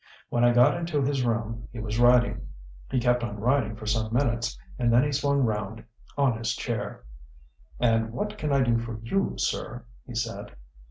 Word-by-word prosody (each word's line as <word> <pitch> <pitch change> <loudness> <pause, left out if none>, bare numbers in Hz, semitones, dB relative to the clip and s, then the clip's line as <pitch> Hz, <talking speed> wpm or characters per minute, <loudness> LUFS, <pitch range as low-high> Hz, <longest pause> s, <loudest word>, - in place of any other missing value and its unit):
When 120 - +1
I 120 - +6
got 120 0 +5
into 165 -4 -1
his 135 -1 0
room, 115 -1 -2
he 120 - -10
was 110 +1 -3
writing. 120 0 +4 0.4
He 130 - +1
kept 120 0 +2
on 105 -3 -4
writing 120 -1 +1
for 110 0 -9
some 110 0 0
minutes, 120 -2 0 0.2
and 120 -1 +2
then 120 +2 +5
he 145 - 0
swung 140 0 +1
round 110 -1 -2 0.3
on 130 -5 +2
his 115 - -1
chair. - - -4 0.8
"'And 115 -1 +2
what 210 - -3
can 150 -8 -2
I 140 -1 +4
do 120 -2 +2
for 115 -1 -5
you, 195 +12 0
sir?' - - -2 0.2
he 120 - -8
said. 115 -3 -4
120 Hz, 185 wpm, -27 LUFS, 115-130 Hz, 0.8 s, I